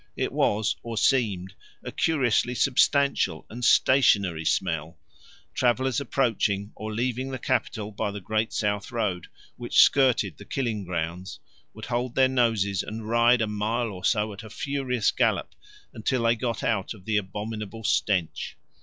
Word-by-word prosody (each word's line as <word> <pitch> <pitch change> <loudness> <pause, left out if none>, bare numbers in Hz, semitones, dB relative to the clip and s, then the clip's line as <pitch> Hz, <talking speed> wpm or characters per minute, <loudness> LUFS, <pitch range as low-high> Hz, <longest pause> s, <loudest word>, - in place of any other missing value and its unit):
It - - -1
was, 105 +1 +1
or 115 -1 -6
seemed, 105 -6 +1 0.3
a - - -6
curiously 125 -5 +1
substantial 140 +2 +2
and 120 +2 -7
stationary 100 -12 +4
smell; 80 -3 -1 0.6
travellers 130 +1 +1
approaching 110 -6 0
or 110 0 -6
leaving 125 +3 -2
the 130 - -4
capital 110 -4 -2
by 105 0 -2
the 100 0 -6
great 110 +3 -1
south 105 -2 -2
road, 105 -7 -2 0.3
which 120 -1 0
skirted 125 - +4
the - - -11
killing 115 -7 -2
grounds, 90 +1 -4 0.4
would 110 0 -8
hold 120 0 -2
their 130 -1 +5
noses 115 -7 +1
and 110 0 -7
ride 120 +1 +4
a - - -1
mile 110 +3 -1
or 90 -2 -9
so 105 -2 +1
at 100 - -9
a 110 - -11
furious 130 -2 -1
gallop - - 0 0.4
until 120 +2 -1
they 115 0 +3
got 115 0 -3
out 110 -1 -1
of 95 - -17
the 110 -1 +1
abominable 105 +2 -5
stench. 95 -5 0
110 Hz, 155 wpm, -26 LUFS, 100-125 Hz, 0.6 s, their